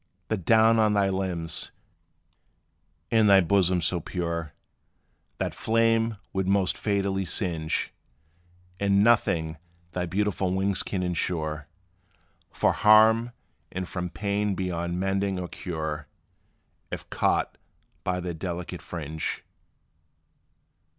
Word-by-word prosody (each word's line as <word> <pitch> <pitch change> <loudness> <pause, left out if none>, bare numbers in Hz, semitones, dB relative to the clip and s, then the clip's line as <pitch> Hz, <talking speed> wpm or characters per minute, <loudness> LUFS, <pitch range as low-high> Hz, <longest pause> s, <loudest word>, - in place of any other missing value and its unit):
The 110 - +1
down 110 +4 +4
on 105 -1 +3
thy 100 -1 +3
limbs 90 -4 -3 1.4
and 110 -2 +5
thy 100 -1 +8
bosom 90 -1 +3
so 85 +2 0
pure 85 -2 -4 0.8
That - - -2
flame 115 0 +2 0.2
would 95 -1 -1
most 95 -1 +2
fatally 100 -2 0
singe: 80 -3 -1 0.9
And 100 0 +3
nothing 85 -9 +2 0.3
thy 90 0 -2
beautiful 95 -1 0
wings 95 0 +1
can 95 -2 -3
insure 80 -4 -2 0.8
From - - +1
harm 110 +2 +5 0.4
and 95 0 -4
from 90 -1 -4
pain 100 +1 -1
beyond 85 -1 -2
mending 95 0 0
or 90 - -4
cure, 80 -4 -5 0.8
If - - -6
caught - - 0 0.4
by 90 0 -1
their 90 -1 -4
delicate 85 +1 -5
fringe. 80 -2 -4
95 Hz, 110 wpm, -26 LUFS, 85-100 Hz, 1.4 s, thy